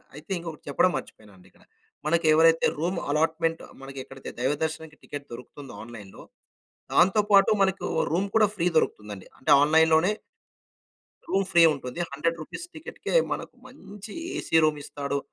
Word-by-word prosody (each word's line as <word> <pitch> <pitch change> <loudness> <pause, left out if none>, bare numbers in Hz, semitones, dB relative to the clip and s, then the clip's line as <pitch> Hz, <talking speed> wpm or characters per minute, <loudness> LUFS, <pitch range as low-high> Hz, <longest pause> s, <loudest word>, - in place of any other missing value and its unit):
అయితే 150 +5 -12
ఇంకొకటి 165 -3 -8
చెప్పడం 180 +6 +3
మర్చిపోయానండి 95 -4 -12
ఇక్కడ. - - -25 0.4
మనకెవరైతే 165 0 +4
రూమ్ 175 +2 -1
అలాట్మెంట్ 165 +2 0 0.2
మనకి 135 0 -9
ఎక్కడైతే 135 0 -10
దైవ 130 +4 +1
దర్శనానికి 160 -1 -5
టికెట్ 145 -1 -8
దొరుకుతుందో 135 +3 -10
ఆన్లైన్‌లో, 110 -4 -11 0.7
దాంతో 190 +4 +5
పాటు 195 -1 +6
మనకు 190 0 0 0.2
రూమ్ 180 +5 +1
కూడా 220 -1 +5
ఫ్రీ 170 -2 0
దొరుకుతుంది 105 -8 -2
అండి. 95 - -13
అంటే 140 - -2
ఆన్లైన్‌లోనే... 160 +4 +4 1.2
రూమ్ 195 0 +1
ఫ్రీ 175 -2 +6
ఉంటుంది. 125 0 -8
100 165 +4 -1
రూపీస్ 155 - -7
టికెట్‌కి 315 - -7 0.2
మనకు - - -5
మంచి 210 -6 -12 0.2
ఏసీ - - 0
రూమ్ 155 -1 +1
ఇస్తాడు. 140 0 -3
160 Hz, 140 wpm, -26 LUFS, 140-175 Hz, 1.2 s, పాటు